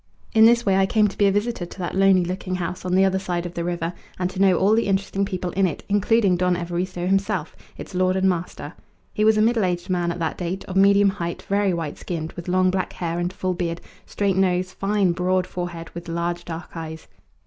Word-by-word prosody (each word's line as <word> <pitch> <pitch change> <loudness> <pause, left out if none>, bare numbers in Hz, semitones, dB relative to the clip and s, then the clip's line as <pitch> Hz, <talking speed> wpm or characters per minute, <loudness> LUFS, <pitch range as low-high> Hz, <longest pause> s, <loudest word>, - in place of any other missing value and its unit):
In 220 -1 +7
this 235 +1 +5
way 195 -2 +3
I 195 0 +3
came 215 +1 +3
to 195 - -7
be 205 - +3
a - - +4
visitor 205 0 -1
to - - -12
that 180 -2 -4
lonely 190 -2 +4
looking 185 +1 -3
house 180 0 -4
on 180 0 0
the 190 +1 +5
other 190 0 +1
side 180 -2 -3
of 175 - -6
the 170 - -3
river, 175 0 -2 0.2
and 180 0 -1
to 190 - -4
know 190 -3 +5
all 200 +3 +3
the 230 -1 +2
interesting 195 0 0
people 185 -2 -3
in 195 +1 +2
it, 165 - -5
including 205 -1 +3
Don 180 0 +2
Evaristo 175 +1 -3
himself, 195 +1 0 0.2
its - - -9
lord 185 0 +2
and 190 0 +2
master. 180 -1 -3 0.4
He 210 - 0
was 220 0 +5
a 215 - +4
middle 230 -1 +2
aged 180 0 -1
man 175 -1 0
at 170 - -5
that 165 -2 -3
date, 180 +2 -3
of 185 - -7
medium 200 +1 +5
height, 170 -3 -4
very 200 0 +1
white 165 -4 -4
skinned, 165 -2 -4
with 175 0 -9
long 185 0 +3
black 185 -1 -2
hair 170 -1 -3
and 175 +1 -1
full 185 0 -2
beard, 170 -1 -3 0.3
straight 200 -2 0
nose, 185 -1 +1
fine 195 -1 +1
broad 180 +1 +1
forehead, 175 -2 -6
with 170 0 -8
large 170 +1 -2
dark 165 0 -7
eyes. 160 -1 -7
185 Hz, 235 wpm, -23 LUFS, 175-195 Hz, 0.4 s, In